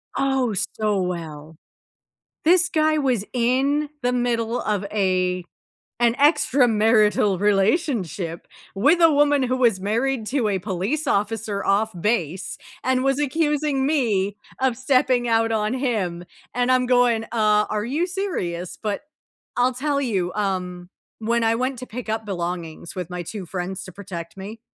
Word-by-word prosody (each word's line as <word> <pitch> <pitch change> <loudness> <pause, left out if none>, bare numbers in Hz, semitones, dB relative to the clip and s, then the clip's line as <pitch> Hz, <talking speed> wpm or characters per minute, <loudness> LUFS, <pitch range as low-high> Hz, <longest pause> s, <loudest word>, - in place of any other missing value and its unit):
Oh, 265 -4 +1 0.2
so 210 -3 +1
well. 160 -3 -5 0.9
This 355 +2 +5
guy 310 -1 +2
was 255 -8 +1
in 270 +5 +1
the 245 0 +1
middle 240 -1 0
of 205 -2 -1
a 185 -3 +1 0.6
an 235 -1 +3
extramarital 225 - +3
relationship 195 - 0 0.3
with 285 - +3
a 330 -2 +6
woman 290 -1 +3
who 255 0 0
was 235 -7 +3
married 230 +5 -1
to 250 -1 0
a 200 -2 +1
police 200 - -2
officer 210 -2 -1
off 210 +3 +2
base, 185 -4 -1 0.3
and 260 0 +1
was 270 +1 +1
accusing 295 -1 0
me 215 -10 +1 0.2
of 260 -2 +1
stepping 255 -2 +2
out 225 0 +2
on 215 0 0
him 210 -10 -1 0.3
and 245 +1 +2
I'm 255 0 +3
going, 245 -3 +3
"Uh, 210 -2 +2
are 210 0 -1
you 300 +9 0
serious?" 185 - -3
But 210 -2 -2 0.6
I'll 250 +1 +3
tell 280 +2 0
you, 195 -9 -1
um, 180 -3 -3 0.3
when 230 +1 0
I 225 0 +3
went 255 +2 -1
to 255 - -7
pick 245 -1 -7
up 220 0 -2
belongings, 170 -4 -5
with 180 -2 -5
my 180 - -4
2 195 +2 -6
friends 185 +2 -4
to 185 - -10
protect 170 -3 -8
me 210 +4 -8
225 Hz, 150 wpm, -23 LUFS, 195-260 Hz, 0.9 s, a